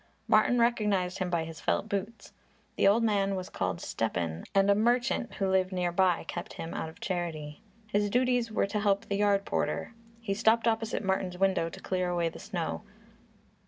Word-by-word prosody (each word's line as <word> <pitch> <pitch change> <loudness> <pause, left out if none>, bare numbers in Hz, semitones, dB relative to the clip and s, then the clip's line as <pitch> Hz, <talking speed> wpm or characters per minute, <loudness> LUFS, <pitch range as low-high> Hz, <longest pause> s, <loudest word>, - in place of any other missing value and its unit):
Martin 245 - +4
recognized 210 -6 +1
him 185 -1 -1
by 170 -2 0
his 160 -1 -8
felt - - 0
boots. 210 +2 -4 0.4
The - - +3
old 220 +4 +4
man 200 -3 +1
was 185 +1 -5
called 90 -2 -2
Stepan 85 -7 -2
and 195 0 +5
a - - +7
merchant 240 +3 +1
who 195 - 0
lived 190 0 +2
near 180 -1 0
by 180 -1 +2
kept 175 - -6
him 165 - -6
out 160 - -3
of 160 - -15
charity. 160 -5 -4 0.2
His 205 -1 0
duties 245 0 +1
were 215 - +1
to 205 +2 -2
help 200 -1 +1
the 200 - -2
yard 200 -1 +2
porter. - - -2 0.3
He 225 -4 -2
stopped 225 +2 +3
opposite 225 -1 0
Martin's 190 -2 -1
window 190 -3 +2
to - - -10
clear 185 -1 -1
away 170 -1 0
the - - -11
snow. - - -3
195 Hz, 190 wpm, -29 LUFS, 175-215 Hz, 0.4 s, a